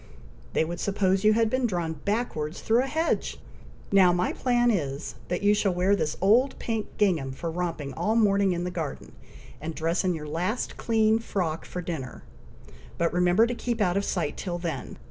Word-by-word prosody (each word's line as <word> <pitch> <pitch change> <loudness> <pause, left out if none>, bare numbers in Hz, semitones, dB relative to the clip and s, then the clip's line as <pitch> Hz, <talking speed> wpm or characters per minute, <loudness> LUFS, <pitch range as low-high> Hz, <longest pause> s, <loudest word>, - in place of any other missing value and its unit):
They - - +2
would 170 +1 -5
suppose 195 -1 +1
you 215 0 +6
had 225 +1 +3
been 255 +2 +1
drawn 175 -5 -2
backwards 165 -3 -2
through 230 +2 +3
a 265 - -2
hedge! 320 +4 -1 0.5
Now 190 -3 +6
my 180 +1 0
plan 240 -1 +2
is, 145 -6 -2
that 180 +3 -2
you 205 0 +5
shall 200 -3 +1
wear 185 +3 +3
this 155 -5 -2
old 235 +8 +3
pink 225 -3 -2
gingham 170 -10 +1
for 165 +5 -4
romping 165 -5 -3
all 215 - 0
morning 200 -3 +3
in 175 0 -1
the 180 - -3
garden, 160 -5 -5 0.5
and 160 +1 -5
dress 165 +3 0
in 180 -2 +1
your 150 -1 -6
last 180 +10 -2
clean 220 -1 +2
frock 175 -8 -2
for 180 - -5
dinner; 155 -7 -5 0.7
but 170 0 +1
remember 180 +5 +4
to 240 - -2
keep 240 -1 -3
out 180 -4 +2
of 200 - +1
sight 170 -7 -2
till 175 -2 -3
then. 165 -6 -5
185 Hz, 190 wpm, -27 LUFS, 165-215 Hz, 0.7 s, you